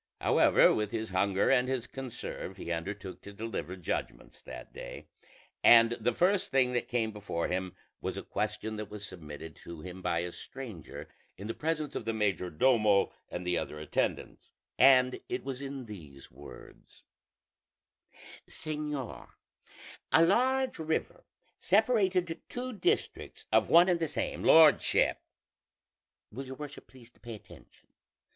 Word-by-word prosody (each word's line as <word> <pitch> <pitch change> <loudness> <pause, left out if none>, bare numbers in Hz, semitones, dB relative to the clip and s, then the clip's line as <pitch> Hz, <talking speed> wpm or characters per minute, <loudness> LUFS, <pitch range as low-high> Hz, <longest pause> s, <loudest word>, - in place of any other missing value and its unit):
However, - - +5
with 105 -1 -1
his 110 -1 -3
hunger 95 +3 +2
and 125 -1 +3
his 130 -2 -1
conserve 130 -3 -7
he 85 - -6
undertook 95 +3 -5
to 100 - -10
deliver 100 -5 -5
judgments 90 -3 -5
that - - -10
day; - - -8 0.6
and 115 -1 +8
the 120 +2 +1
first 185 +2 +2
thing 130 -2 +2
that 120 - -1
came 115 -3 0
before 100 -5 -3
him 95 0 -3 0.3
was - - -3
a - - -5
question 110 +1 -3
that 105 -1 -6
was 105 0 -7
submitted 80 -2 -9
to 85 -2 -10
him 90 +1 -8
by 85 -2 0
a 90 0 -4
stranger 110 - -9 0.3
in 100 - -8
the 115 - -3
presence 155 -1 -2
of - - -5
the 115 - -1
major 100 -4 0
domo 105 +2 +3 0.2
and 90 - -5
the 90 -1 +1
other 75 - -6
attendants, 75 - -3 0.3
and 130 -1 +6
it 125 - -3
was 135 -1 -5
in 135 -2 -6
these 75 -11 -11
words: - - -14 1.5
"Señor, 150 -4 -5 0.8
a 165 - +6
large 260 +6 +2
river 160 0 -2 0.3
separated 190 -5 +2
two 250 +1 -4
districts 360 - -2
of - - +3
one 170 +2 +7
and 175 -2 +2
the 165 - 0
same - - -3
lordship 160 -2 +5 1.1
will 130 +5 -7
your 130 - -7
worship 150 +1 -9
please 120 -2 -16
to - - -29
pay 120 -2 -8
attention? 105 - -17
115 Hz, 150 wpm, -30 LUFS, 95-150 Hz, 1.5 s, and